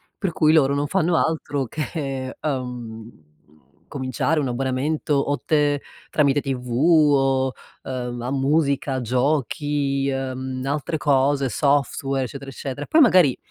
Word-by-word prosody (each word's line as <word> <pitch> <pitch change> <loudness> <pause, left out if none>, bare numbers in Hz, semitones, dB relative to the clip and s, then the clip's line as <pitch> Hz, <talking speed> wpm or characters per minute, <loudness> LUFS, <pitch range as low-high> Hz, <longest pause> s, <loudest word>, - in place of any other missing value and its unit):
Per 190 -4 -2
cui, 155 0 +3
loro 140 -3 +4
non 145 - 0
fanno 170 +1 +1
altro 145 -4 -1
che, 135 -1 -4
uhm, 125 -5 -5 0.8
cominciare 135 +4 -1
un 135 - -1
abbonamento, 135 +5 -1
o 145 +1 0
t 145 -2 +2 0.4
tramite 145 -1 +3
TV 130 -3 -4
o, 135 -2 +3 0.3
uhm, 125 -2 -4
a 125 - -3
musica, 140 -1 +1
giochi, 140 +2 0
uhm, 130 -1 -4
altre 145 +3 -2
cose, 140 -2 +2
software, 140 -1 0
eccetera, 140 +2 -9
eccetera. 135 +1 -6
Poi, 320 - +4
magari, 185 - +5
140 Hz, 125 wpm, -22 LUFS, 130-150 Hz, 0.8 s, magari